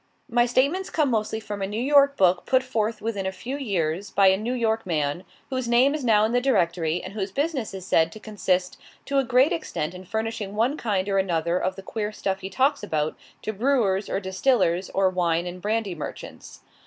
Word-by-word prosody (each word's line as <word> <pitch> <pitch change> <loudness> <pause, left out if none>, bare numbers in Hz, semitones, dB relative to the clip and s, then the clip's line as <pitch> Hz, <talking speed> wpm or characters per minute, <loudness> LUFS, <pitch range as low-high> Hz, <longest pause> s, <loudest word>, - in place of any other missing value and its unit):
My 240 +1 +2
statements 280 +10 +1
come 300 -5 +1
mostly 220 -1 -1
from 205 -2 -6
a 195 - -1
New 210 +3 -3
York 280 +2 +4
book 180 -2 +3
put 260 0 +3
forth 225 -4 -2
within 205 -4 -2
a - - -1
few 250 +7 -6
years 190 - -2
by 195 -1 +5
a 190 - +4
New 220 +5 -3
York 225 -2 0
man, 155 -1 -1 0.3
whose 255 -2 -2
name 245 +4 +4
is 305 -2 -3
now 215 -3 +4
in 220 - -1
the 245 +1 +2
Directory, 170 -9 +1
and 185 - -7
whose 200 -2 -3
business 280 - -2
is 190 -2 -8
said 165 -3 +3
to 215 - -10
consist 185 -4 -1 0.3
to 275 0 +1
a - - +2
great 255 +5 +3
extent 180 - -3
in 180 0 -9
furnishing 220 -1 -3
one 235 +7 +1
kind 205 -8 -1
or 195 -1 +2
another 170 -2 0
of 185 - -1
the 195 - -9
queer 210 +1 -3
stuff 195 -2 -2
he 190 - -6
talks 270 +8 +1
about, 155 -6 -1 0.3
to 215 - -3
brewers, 215 -4 +1
or - - 0
distillers, 190 -2 +1
or 195 0 +2
wine 175 -2 0
and 180 +1 -7
brandy 210 -1 -1
merchants. 155 - -9
210 Hz, 215 wpm, -25 LUFS, 185-245 Hz, 0.3 s, by